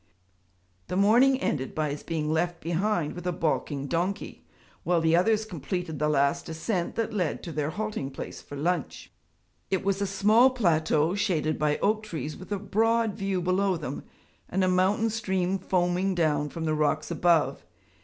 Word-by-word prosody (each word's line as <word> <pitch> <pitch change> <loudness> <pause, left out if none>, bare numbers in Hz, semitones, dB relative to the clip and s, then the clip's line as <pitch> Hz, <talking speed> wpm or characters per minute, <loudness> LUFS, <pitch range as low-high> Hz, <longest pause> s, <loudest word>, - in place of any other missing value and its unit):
The - - -3
morning 240 +7 +5
ended 135 - -2
by 155 -2 0
his 145 - -5
being 155 -2 -2
left 170 +1 0
behind 175 -1 -1
with 175 0 -6
a - - +2
balking 155 -4 -1
donkey, 175 +7 -3 0.4
while 175 -1 +2
the 160 0 +3
others 215 +4 +2
completed 180 -4 -4
the 150 0 +1
last 140 0 +1
ascent 170 +2 -2
that 225 -1 -2
led 180 -8 -1
to 170 - -6
their 150 -1 -1
halting 210 -7 -3
place 135 - -8
for 145 - -10
lunch. 170 +5 -2 0.6
It 190 0 -1
was 195 0 0
a 200 - +1
small 210 +6 +5
plateau 165 - +2
shaded 175 -7 0
by 150 -1 +1
oak 215 +1 +2
trees 155 -8 -5
with 185 - -12
a 205 - 0
broad 220 +3 +1
view 195 -2 -2
below 185 +1 +1
them, 145 -3 -5 0.5
and 190 +1 0
a - - +3
mountain 190 +5 +2
stream 190 -3 -1
foaming 185 +1 0
down 150 -3 +1
from 165 +2 -5
the 155 - +1
rocks 155 0 0
above. 155 - +2
180 Hz, 175 wpm, -27 LUFS, 155-200 Hz, 0.6 s, morning